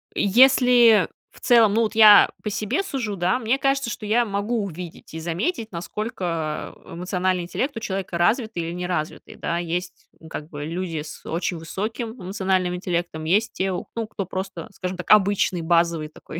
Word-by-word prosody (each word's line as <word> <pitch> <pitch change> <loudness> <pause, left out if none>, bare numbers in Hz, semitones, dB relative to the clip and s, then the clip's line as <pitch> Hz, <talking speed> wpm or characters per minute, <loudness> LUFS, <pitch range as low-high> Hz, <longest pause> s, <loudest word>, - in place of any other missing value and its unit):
Если 240 0 +5 0.2
в - - -18
целом, 230 -4 +5
ну, 230 - +3
вот 220 0 -2
я 215 -2 +8
по 215 - -2
себе 215 - -1
сужу, 250 - -3
да, 185 +7 +1
мне 235 +3 +1
кажется, 275 -2 0
что 215 - -6
я 235 +3 +2
могу 210 +3 -1
увидеть 175 -3 -9
и 160 - -5
заметить, 215 - -2
насколько 170 -4 -4
эмоциональный 180 +1 -2
интеллект 255 +10 -3
у - - -2
человека 190 -4 -4
развитый 220 +1 +1
или 165 +1 -4
неразвитый, 175 -3 -4
да. 170 - -2
Есть, 175 +1 -4
ну, 160 - -14
как 155 0 -7
бы 145 -1 -6
люди 165 -1 -3
с 150 -1 -10
очень 170 +1 -2
высоким 215 +8 -4
эмоциональным 185 -1 -1
интеллектом, 175 -3 -3
есть 200 +8 +1
те, 190 0 -1
ну, 225 +5 -4
кто 200 -2 -5
просто, 190 +3 -5
скажем 185 0 -4
так, 180 - -8
обычный 200 -3 +4
базовый 165 -2 +1
такой, 155 +1 -9
190 Hz, 170 wpm, -23 LUFS, 170-220 Hz, 0.2 s, я